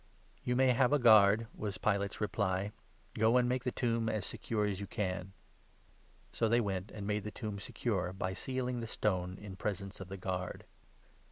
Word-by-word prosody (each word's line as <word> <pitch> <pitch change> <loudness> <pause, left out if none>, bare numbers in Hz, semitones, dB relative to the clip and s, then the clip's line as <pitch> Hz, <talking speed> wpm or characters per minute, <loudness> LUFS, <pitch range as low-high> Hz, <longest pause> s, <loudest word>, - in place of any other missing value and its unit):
"You 125 - 0
may 130 +1 +5
have 125 +1 +4
a 145 - +5
guard," 110 -3 +7
was 105 -2 -4
Pilate's 100 -2 0
reply; 100 -2 0 0.4
"go 110 +3 +4
and 125 - +5
65 - - +1
make 125 0 0
the 125 - +1
tomb 115 -2 0
as 105 -4 -1
secure 105 +1 -1
as 100 -2 -1
you 100 - -5
can." 95 -2 -3 1.0
So 115 - +1
they 120 +2 +4
went 100 -3 -2
and 105 -1 -7
made 105 0 -1
the 105 - -4
tomb 105 -3 -5
secure, 100 -4 -2
by 95 0 -3
sealing 125 +3 -2
the 115 - -4
stone, 90 -4 0
66 100 +2 -10
in 95 - -7
presence 100 -1 -3
of 95 - -6
the 95 +1 -6
guard. 90 -1 -4
105 Hz, 195 wpm, -33 LUFS, 95-115 Hz, 1.0 s, guard